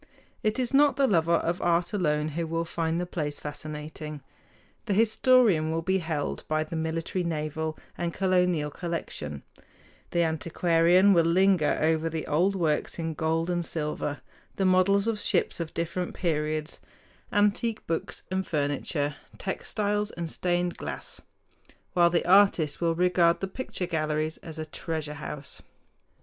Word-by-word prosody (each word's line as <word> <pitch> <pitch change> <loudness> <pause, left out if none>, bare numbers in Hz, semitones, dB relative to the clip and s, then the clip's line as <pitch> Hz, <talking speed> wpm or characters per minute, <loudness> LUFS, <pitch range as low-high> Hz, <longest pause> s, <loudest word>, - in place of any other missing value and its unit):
It 215 +2 0
is 250 -1 -1
not 285 +1 +5
the 275 - +3
lover 170 -7 +3
of 170 +1 -1
art 175 +1 +1
alone 150 -6 +1
who 165 +2 -3
will 165 +1 -1
find 165 0 -1
the 180 - -1
place 150 -4 -3
fascinating: 150 0 -7 0.6
the 200 - +1
historian 220 -6 +4
will 165 +1 -1
be 190 +3 +1
held 160 -4 -3
by 155 0 +1
the 155 +1 -7
military, 165 +3 -2
naval, 155 -1 -3 0.2
and 170 -1 -1
colonial 180 -5 +1
collection; 140 - -4 0.7
the 170 - +2
antiquarian 170 +4 +3
will 170 -2 +4
linger 180 -3 +3
over 160 +1 +1
the 160 -1 -4
old 180 +6 +2
works 160 -5 0
in 165 -1 -2
gold 160 +2 0
and 175 -1 0
silver, 150 -3 -3 0.3
the 195 - 0
models 185 +2 +4
of 225 -2 0
ships - - +1
of 165 -2 -4
different 170 +2 -3
periods, 155 -2 -2 0.5
antique 210 +2 +1
books 165 0 -3
and 190 0 -1
furniture, 145 -1 -1 0.2
textiles 210 +2 -1
and 170 -4 -5
stained 175 -1 -1
glass; 75 -2 -5 0.7
while 175 -1 +5
the 170 0 +1
artist 180 -6 +4
will 165 -1 +2
regard 175 -1 +3
the 195 - -2
picture 190 -3 -4
galleries 155 -2 -1
as 160 -1 -9
a 155 - -4
treasure 155 -1 -4
house. 150 -1 -7
170 Hz, 150 wpm, -27 LUFS, 155-185 Hz, 0.7 s, not